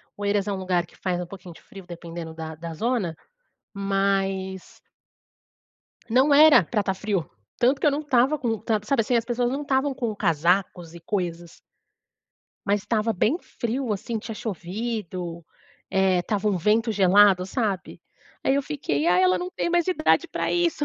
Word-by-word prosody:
Oeiras 205 Hz, 0 st, 0 dB
é -, -, -1 dB
lugar 185 Hz, -2 st, 0 dB
que -, -, -22 dB
faz 180 Hz, -2 st, -2 dB
pouquinho 180 Hz, -1 st, -11 dB
de -, -, -17 dB
frio 195 Hz, -2 st, -13 dB
dependendo 170 Hz, -1 st, -8 dB
da 160 Hz, -1 st, -7 dB
da 165 Hz, +1 st, -7 dB
zona, 220 Hz, -3 st, -1 dB, 0.6 s
mas 195 Hz, -1 st, -1 dB, 1.3 s
Não 260 Hz, +5 st, +4 dB
era 300 Hz, -6 st, +8 dB
pra 210 Hz, +5 st, -1 dB
tá 190 Hz, -1 st, -1 dB
frio, 190 Hz, -5 st, -2 dB, 0.3 s
tanto 260 Hz, +3 st, +2 dB
que -, -, +1 dB
eu -, -, +6 dB
não 285 Hz, +2 st, -2 dB
tava 275 Hz, +1 st, +2 dB
com 235 Hz, -4 st, -1 dB
tanto 215 Hz, -1 st, -2 dB
sabe, 275 Hz, -, +2 dB
assim, 240 Hz, +2 st, +1 dB
as 230 Hz, -, +1 dB
pessoas 240 Hz, 0 st, 0 dB
não 280 Hz, +3 st, -3 dB
tavam 275 Hz, 0 st, +1 dB
com 235 Hz, -4 st, -3 dB
casacos 175 Hz, -1 st, 0 dB
e 170 Hz, -, -10 dB
coisas. 175 Hz, -2 st, -4 dB, 1.1 s
Mas 200 Hz, 0 st, +2 dB
estava 220 Hz, +1 st, 0 dB
bem 225 Hz, -, +1 dB
frio, 240 Hz, -5 st, -3 dB
assim, 220 Hz, +3 st, -3 dB
tinha 225 Hz, +1 st, -7 dB
chovido. 185 Hz, -4 st, -5 dB, 0.5 s
Eh, 190 Hz, -1 st, +3 dB
estava 210 Hz, +3 st, -1 dB
um 195 Hz, -, +1 dB
vento 220 Hz, +5 st, +2 dB
gelado, 195 Hz, -1 st, +5 dB
sabe? 200 Hz, -3 st, -3 dB, 0.4 s
Aí 270 Hz, -, +3 dB
eu 280 Hz, -, +1 dB
fiquei: 170 Hz, -, -2 dB
"Ah 180 Hz, +1 st, +4 dB
ela 185 Hz, 0 st, +4 dB
não 180 Hz, 0 st, -4 dB
tem 345 Hz, -, -2 dB
mais 345 Hz, 0 st, +2 dB
idade 330 Hz, -4 st, +2 dB
pra -, -, -2 dB
isso". 340 Hz, -4 st, +1 dB
200 Hz, 170 wpm, -24 LUFS, 180-240 Hz, 1.3 s, era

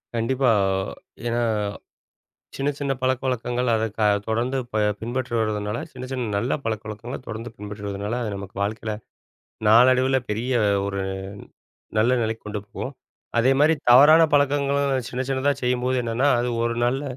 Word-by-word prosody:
கண்டிப்பா 125 Hz, +3 st, +1 dB, 0.8 s
ஏன்னா 120 Hz, 0 st, 0 dB, 1.2 s
சின்ன 140 Hz, +1 st, -1 dB
சின்ன 140 Hz, -1 st, -1 dB
பழக்கவழக்கங்கள் 125 Hz, -1 st, 0 dB
அதை 110 Hz, 0 st, +1 dB, 0.4 s
தொடர்ந்து 120 Hz, +4 st, 0 dB
ப 110 Hz, -, -2 dB, 0.2 s
பின்பற்றுவருவதனால 115 Hz, -3 st, -2 dB
சின்ன 130 Hz, 0 st, -8 dB
சின்ன 125 Hz, -4 st, -2 dB
நல்ல 120 Hz, +5 st, -1 dB
பழக்கவழக்கங்களை 110 Hz, +2 st, -4 dB
தொடர்ந்து 115 Hz, +1 st, -6 dB
பின்பற்றுவதனால, 105 Hz, +1 st, -5 dB
அது 110 Hz, -, -2 dB
நமக்கு 100 Hz, -1 st, -9 dB
வாழ்க்கையில 110 Hz, +1 st, -2 dB, 0.8 s
நாளடைவில 130 Hz, +4 st, +5 dB
பெரிய 115 Hz, +5 st, -1 dB, 0.3 s
ஒரு 100 Hz, -1 st, -2 dB, 1.0 s
நல்ல 115 Hz, +3 st, +4 dB
நிலைக்கு 110 Hz, 0 st, -3 dB
கொண்டு 105 Hz, -1 st, -4 dB
போகும். 135 Hz, +6 st, -6 dB, 0.5 s
அதேமாரி 135 Hz, +6 st, +4 dB, 0.2 s
தவறான 145 Hz, +6 st, +8 dB
பழக்கங்களும் 140 Hz, -2 st, +2 dB
சின்ன 130 Hz, +1 st, -2 dB
சின்னதா 135 Hz, +2 st, +2 dB
செய்யும்போது 125 Hz, +1 st, +1 dB
என்னென்னா, 120 Hz, +4 st, +1 dB
அது 125 Hz, -, -1 dB
ஒரு 115 Hz, 0 st, -1 dB
நல்ல 135 Hz, +3 st, 0 dB
120 Hz, 120 wpm, -23 LUFS, 110-130 Hz, 1.2 s, தவறான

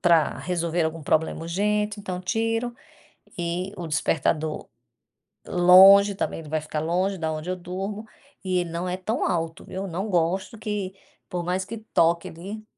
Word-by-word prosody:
para 170 Hz, -3 st, +3 dB
resolver 170 Hz, -2 st, -1 dB
algum 160 Hz, 0 st, -3 dB
problema 160 Hz, +2 st, +1 dB
urgente, 210 Hz, +4 st, 0 dB
então 185 Hz, -3 st, -4 dB
tiro. 225 Hz, +5 st, -1 dB, 0.7 s
E 175 Hz, +3 st, -2 dB
o 175 Hz, -, -5 dB
despertador 155 Hz, 0 st, 0 dB, 0.8 s
longe 190 Hz, +3 st, +7 dB
também, -, -, -2 dB
ele 155 Hz, -2 st, -10 dB
vai 155 Hz, 0 st, -1 dB
ficar 155 Hz, 0 st, -4 dB
longe 185 Hz, +5 st, 0 dB
da 160 Hz, -1 st, -2 dB
onde 155 Hz, +3 st, -5 dB
eu 185 Hz, -, 0 dB
durmo. 195 Hz, +4 st, -5 dB, 0.4 s
E 185 Hz, -1 st, +1 dB
ele 175 Hz, -1 st, -2 dB
não 170 Hz, +2 st, -3 dB
é 180 Hz, -, -1 dB
tão 200 Hz, +5 st, -1 dB
alto, 165 Hz, -2 st, -2 dB
viu. 190 Hz, +1 st, -5 dB
Não 185 Hz, +5 st, -3 dB
gosto 185 Hz, +5 st, 0 dB
que, 205 Hz, -3 st, -3 dB, 0.4 s
por 180 Hz, -3 st, -3 dB
mais 185 Hz, +2 st, -1 dB
que 230 Hz, +2 st, -6 dB, 0.2 s
toque 170 Hz, +1 st, +3 dB
ali, 200 Hz, +6 st, -8 dB
180 Hz, 165 wpm, -25 LUFS, 165-195 Hz, 0.8 s, longe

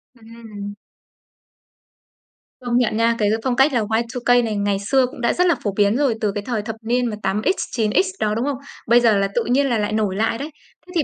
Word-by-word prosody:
Ừm. 220 Hz, -3 st, -10 dB, 1.9 s
Công 240 Hz, 0 st, +1 dB
nhận 240 Hz, -3 st, +1 dB
nha, 230 Hz, +1 st, +2 dB
cái 210 Hz, -1 st, +2 dB
phong 255 Hz, -2 st, 0 dB
cách 270 Hz, +2 st, +4 dB
là 240 Hz, -, +2 dB
Y2K 235 Hz, +3 st, +1 dB
này 220 Hz, -2 st, -2 dB
ngày 200 Hz, -1 st, 0 dB
xưa 255 Hz, +6 st, +2 dB
cũng 250 Hz, 0 st, -9 dB
đã 235 Hz, -, +2 dB
rất 360 Hz, +1 st, +2 dB
là 345 Hz, -, +3 dB
phổ 205 Hz, -, 0 dB
biến 205 Hz, +2 st, +3 dB
rồi 270 Hz, -6 st, +1 dB
từ 210 Hz, -2 st, +1 dB
cái 205 Hz, -, -4 dB
thời 235 Hz, -4 st, -2 dB
thập 220 Hz, +1 st, -6 dB
niên 245 Hz, +2 st, 0 dB
mà 225 Hz, -3 st, -2 dB
8X-9X 215 Hz, -, 0 dB
đó, 210 Hz, 0 st, 0 dB
đúng 235 Hz, +4 st, -1 dB
không? 285 Hz, -3 st, -2 dB, 0.3 s
Bây 240 Hz, +2 st, +6 dB
giờ 225 Hz, -4 st, +3 dB
là 195 Hz, -, +1 dB
tự 240 Hz, -, +2 dB
nhiên 270 Hz, +3 st, +2 dB
là 235 Hz, -, +1 dB
lại 210 Hz, 0 st, -1 dB
nổi 210 Hz, -3 st, 0 dB
lại 225 Hz, +2 st, 0 dB
đấy. 290 Hz, +3 st, -5 dB, 0.4 s
Thế -, -, -12 dB
thì 320 Hz, -, +2 dB
230 Hz, 225 wpm, -21 LUFS, 210-245 Hz, 1.9 s, Bây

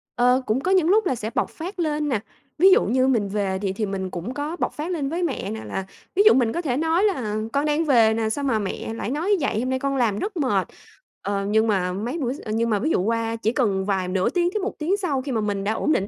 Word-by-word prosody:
Ờ, 250 Hz, +2 st, +3 dB
cũng 220 Hz, +4 st, +1 dB
có 370 Hz, -, 0 dB
những 365 Hz, -4 st, +4 dB
lúc 430 Hz, +2 st, +4 dB
là 265 Hz, -, +1 dB
sẽ 220 Hz, -2 st, -4 dB
bộc -, -, +1 dB
phát 365 Hz, +4 st, -7 dB
lên 300 Hz, -2 st, 0 dB
nè, 235 Hz, -6 st, +1 dB, 0.4 s
ví 375 Hz, +5 st, +7 dB
dụ -, -, +6 dB
như 255 Hz, +4 st, +2 dB
mình 230 Hz, -6 st, +2 dB
về 195 Hz, -2 st, -1 dB
thì 195 Hz, -2 st, -1 dB
thì 215 Hz, +2 st, -2 dB
mình 195 Hz, -1 st, -3 dB
cũng 185 Hz, +8 st, -5 dB
có 295 Hz, +3 st, -3 dB
bộc -, -, -1 dB
phát 310 Hz, +4 st, -4 dB
lên 295 Hz, -6 st, -2 dB
với 340 Hz, +4 st, -2 dB
mẹ 265 Hz, -, -2 dB
nè 220 Hz, 0 st, -6 dB
là 190 Hz, -, -4 dB, 0.3 s
ví 400 Hz, -, +5 dB
dụ 430 Hz, -, +8 dB
mình 240 Hz, -4 st, +2 dB
có 340 Hz, -, -1 dB
thể 265 Hz, -7 st, -1 dB
nói 325 Hz, +4 st, +2 dB
là 255 Hz, -, 0 dB, 0.2 s
"Con 285 Hz, +1 st, +1 dB
đang 305 Hz, +2 st, +1 dB
về 230 Hz, -6 st, +5 dB
nè, 220 Hz, -1 st, 0 dB
sao 285 Hz, +6 st, -2 dB
mà 250 Hz, -6 st, +1 dB
mẹ 205 Hz, +2 st, -4 dB
lại 230 Hz, -, -4 dB
nói 340 Hz, +9 st, +1 dB
vậy? 270 Hz, -6 st, 0 dB
Hôm 255 Hz, +2 st, -1 dB
nay 260 Hz, 0 st, 0 dB
con 275 Hz, +1 st, -1 dB
làm 225 Hz, -6 st, +1 dB
rất 400 Hz, -2 st, -4 dB
mệt." 210 Hz, -, +1 dB, 0.5 s
Ờ, 200 Hz, 0 st, -2 dB
nhưng 220 Hz, +2 st, +2 dB
mà 185 Hz, -4 st, +1 dB
mấy 230 Hz, -, -3 dB
bữa 260 Hz, -6 st, -1 dB
x 280 Hz, -, -10 dB
ơ, 215 Hz, -, -6 dB
nhưng 230 Hz, +1 st, +1 dB
mà 210 Hz, -2 st, +1 dB
ví 295 Hz, -, 0 dB
dụ 255 Hz, -, +2 dB
qua 230 Hz, +2 st, -1 dB
chỉ 225 Hz, -1 st, 0 dB
cần 200 Hz, -8 st, +1 dB
vài 190 Hz, -3 st, 0 dB
nửa 185 Hz, 0 st, +1 dB
tiếng 350 Hz, -1 st, +1 dB
tới 425 Hz, -, 0 dB
1 400 Hz, -, -2 dB
tiếng 345 Hz, +6 st, +1 dB
sau 315 Hz, -10 st, -1 dB
khi 275 Hz, +1 st, -5 dB
mà 225 Hz, -3 st, 0 dB
mình 205 Hz, -2 st, -2 dB
đã 210 Hz, -, 0 dB
ổn 305 Hz, -, 0 dB
định 195 Hz, -9 st, +1 dB
250 Hz, 290 wpm, -23 LUFS, 210-310 Hz, 0.5 s, dụ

